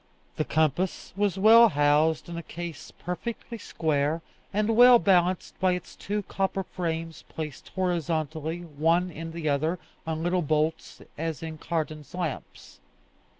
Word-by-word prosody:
The 155 - 0
compass 160 +4 0
was 200 -1 0
well 225 +3 +8
housed 150 +1 +2
in 170 - -6
a 170 - -4
case 165 -2 -7
perfectly 225 +6 -6
square, 155 -2 -1 0.3
and 215 +2 +1
well 245 +1 +9
balanced 185 -4 +2
by 185 -1 +3
its 180 -1 -6
two 205 +1 -3
copper 195 0 -1
frames 165 -3 -4
placed 155 -3 -7
horizontally, 165 -2 -1
one 165 +3 +1
in 165 0 -7
the 165 -1 -4
other, 155 +5 +1 0.3
on 160 0 -2
little 180 +1 +1
bolts, 155 +1 -1 0.2
as 165 0 -3
in 160 -1 -6
Cardan's 155 -1 -4
lamps. 170 -6 -5
165 Hz, 140 wpm, -27 LUFS, 155-185 Hz, 0.3 s, well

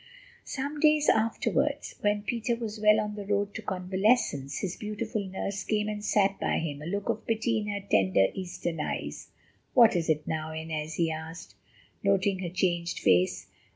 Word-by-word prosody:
Some 285 +2 -4
days 305 0 +4
afterwards, 220 +1 +1
when 205 0 +1
Peter 235 +2 -1
was 225 -2 -5
well 210 0 +5
on 210 -1 -2
the 205 -1 -6
road 205 0 0
to - - -5
convalescence, 190 - +1
his 185 -2 -3
beautiful 215 0 -3
nurse 195 +1 -4
came 210 -1 0
and 210 -1 -4
sat 200 -2 +2
by - - 0
him, 150 -3 -3
a 155 - -6
look 200 +3 -3
of 220 - -2
pity 225 0 +1
in 210 - -4
her 205 -1 -2
tender, 95 - +3
Eastern 175 -3 -4
eyes. - - -4 0.5
"What 235 -5 +7
is 170 -2 0
it 155 -1 +1
now, 160 0 -3
Inez?" 160 -1 -4
he 165 0 +1
asked, 160 +2 -7 0.5
noting 195 -1 +2
her 180 -2 -3
changed 175 -1 0
face. 90 0 +2
195 Hz, 175 wpm, -28 LUFS, 165-215 Hz, 0.5 s, What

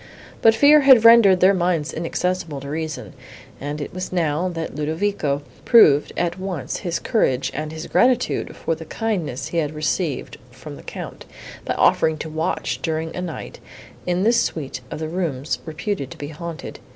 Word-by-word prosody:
But 225 -1 +6
fear 290 +5 +7
had 260 -5 +7
rendered 225 -6 +7
their 190 +2 +6
minds 175 -4 0
inaccessible 170 -2 -2
to 140 - -7
reason; 155 - -5 0.5
and 145 +2 -5
it 145 - -6
was 185 0 -5
now, 170 0 0
that 165 -2 -5
Ludovico 150 -2 -1 0.2
proved 150 - +6
at 175 +1 -1
once 180 -9 -4
his 175 -3 -2
courage 130 - 0
and 155 0 -4
his 160 0 -7
gratitude 250 0 +1
for - - -2
the 160 - -7
kindness 165 - -3
he 170 - -3
had 150 -1 -2
received 155 -1 -2
from 130 +4 -10
the - - -12
Count, - - -8 0.4
by - - -1
offering 160 -1 +3
to 160 - -6
watch, 160 +1 -2
during 160 0 -3
a 180 - -3
night, 175 -4 -7 0.5
in 180 +1 +1
the 230 +3 +4
suite 155 - -1
of 160 - -5
rooms, 155 -4 -2
reputed 160 - -3
to - - -11
be 145 - -6
haunted. 165 +1 -7
165 Hz, 170 wpm, -22 LUFS, 150-185 Hz, 0.5 s, fear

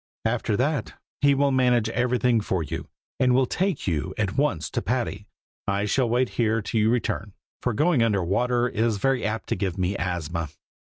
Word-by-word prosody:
"After 110 -2 0
that 140 -2 -1 0.2
he 140 0 +4
will 140 0 +2
manage 125 -4 +3
everything 120 0 +2
for 95 -4 -1
you, - - -5 0.3
and 125 -1 +4
will 130 0 +4
take 185 +3 -1
you 90 +1 -2
at 105 -3 -1
once 85 - 0
to - - -1
Patty. - - -2 0.4
I 100 +1 0
shall 120 +3 +1
wait 125 +2 +2
here 115 -1 +1
till 110 +1 -1
you 110 - +3
return, 110 -4 -1 0.3
for 125 - 0
going 155 +1 +3
under 115 -3 +3
the - - -2
water 120 +7 +1
is 115 -2 0
very 135 +4 +1
apt 110 +1 -2
to - - +1
give 95 -2 -2
me 90 0 0
the 100 - -5
asthma. 85 -2 -2
115 Hz, 200 wpm, -25 LUFS, 100-125 Hz, 0.4 s, he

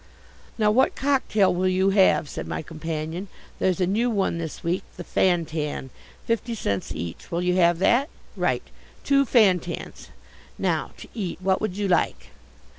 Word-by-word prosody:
"Now, 210 -2 +3
what 260 +5 +3
cocktail 260 -9 +2
will 185 +1 +1
you 190 +1 +2
have?" 190 -5 +4
said - - -6
my - - -4
companion. 160 +3 -5 0.3
"There's 185 -1 +1
a 180 - +3
new 220 +7 +1
one 195 -6 0
this 160 -2 -6
week, 170 +2 0 0.2
the 175 - -6
Fantan, 160 -7 0 0.3
fifty 230 +1 -1
cents 100 - -2
each, 85 0 -6
will 170 +1 -1
you 180 0 +1
have 170 -1 +4
that? 240 - +3 0.3
Right? - - 0 0.4
Two 275 0 +3
Fantans. 185 -8 +1 0.5
Now - - 0
to - - -10
eat 195 -7 -4
what 190 0 +1
would 200 -3 -2
you 205 -1 0
like?" 175 -3 0
185 Hz, 160 wpm, -24 LUFS, 170-210 Hz, 0.5 s, have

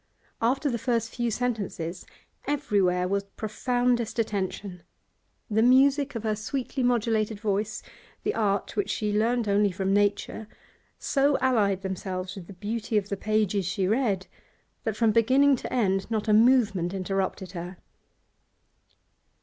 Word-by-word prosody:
After 260 +6 +1
the 240 -4 -1
first 230 -1 -1
few 240 -1 -1
sentences, 205 -7 -3 0.4
everywhere 195 -11 +1
was 200 +1 0
profoundest 245 +1 0
attention; 200 -4 -3 0.7
the 220 +1 +1
music 275 +3 +4
of 225 - -4
her 215 -1 0
sweetly 260 +5 -3
modulated 225 -3 +1
voice, 210 0 -2 0.4
the 420 - 0
art 200 -2 -1
which 205 - -1
she 210 -1 -1
learnt 230 +1 +1
only 205 0 +3
from 190 +2 -1
nature, 205 +1 0 0.5
so 280 0 +2
allied 205 -7 +2
themselves 185 -1 -4
with 190 -4 -9
the - - -10
beauty 220 +4 -2
of 205 -1 -1
the 200 - -1
pages 210 -2 0
she 185 0 0
read 210 -4 +1 0.6
that 220 -1 -2
from 225 -1 +3
beginning 260 +6 +4
to - - -7
end 195 -5 +1
not 220 -1 -1
a 215 - +4
movement 210 -6 +3
interrupted 190 -1 -2
her. 180 0 -7
215 Hz, 140 wpm, -27 LUFS, 195-240 Hz, 0.7 s, music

